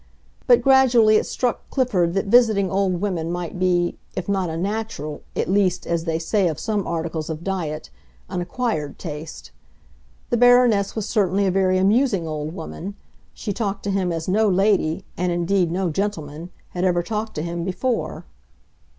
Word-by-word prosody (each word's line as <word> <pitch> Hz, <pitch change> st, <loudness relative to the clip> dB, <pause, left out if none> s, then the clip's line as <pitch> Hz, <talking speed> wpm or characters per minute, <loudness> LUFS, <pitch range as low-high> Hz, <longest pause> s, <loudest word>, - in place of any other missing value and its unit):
But 485 Hz, -1 st, +5 dB
gradually 245 Hz, -5 st, +5 dB
it -, -, -1 dB
struck 245 Hz, -2 st, -2 dB
Clifford 195 Hz, -10 st, +1 dB
that 195 Hz, -, +1 dB
visiting 210 Hz, -3 st, +4 dB
old 190 Hz, -2 st, 0 dB
women 175 Hz, -5 st, -1 dB
might 175 Hz, 0 st, -4 dB
be, 175 Hz, -1 st, +1 dB, 0.2 s
if 185 Hz, -, -4 dB
not 190 Hz, -3 st, 0 dB
a 160 Hz, -, -4 dB
natural, 195 Hz, -6 st, -3 dB
at -, -, -1 dB
least, 185 Hz, -2 st, +1 dB
as 170 Hz, -1 st, -1 dB
they 165 Hz, -1 st, 0 dB
say 185 Hz, +4 st, +1 dB
of 155 Hz, -4 st, -3 dB
some 210 Hz, -3 st, -1 dB
articles 160 Hz, -1 st, -3 dB
of 160 Hz, +1 st, -5 dB
diet, 165 Hz, -6 st, -3 dB, 0.4 s
an 185 Hz, -2 st, -3 dB
acquired 175 Hz, -, -2 dB
taste. 155 Hz, -2 st, -8 dB, 0.8 s
The 240 Hz, -, +3 dB
Baroness 245 Hz, -4 st, +4 dB
was 215 Hz, -3 st, -2 dB
certainly 200 Hz, -3 st, +1 dB
a 190 Hz, -, +2 dB
very 185 Hz, 0 st, +2 dB
amusing 200 Hz, -2 st, +2 dB
old 155 Hz, 0 st, -4 dB
woman; 190 Hz, +3 st, -7 dB, 0.4 s
she 205 Hz, -, -4 dB
talked 200 Hz, -2 st, -3 dB
to 200 Hz, -, -1 dB
him 190 Hz, -2 st, 0 dB
as 165 Hz, -1 st, -3 dB
no 210 Hz, +3 st, +3 dB
lady—and 180 Hz, -2 st, +1 dB
indeed 175 Hz, +1 st, +1 dB
no 180 Hz, -1 st, 0 dB
gentleman—had 175 Hz, -1 st, -4 dB
ever 175 Hz, -2 st, +2 dB
talked 215 Hz, +4 st, -4 dB
to 150 Hz, -, -2 dB
him 170 Hz, 0 st, -3 dB
before. 225 Hz, +7 st, -2 dB
185 Hz, 165 wpm, -22 LUFS, 170-210 Hz, 0.8 s, But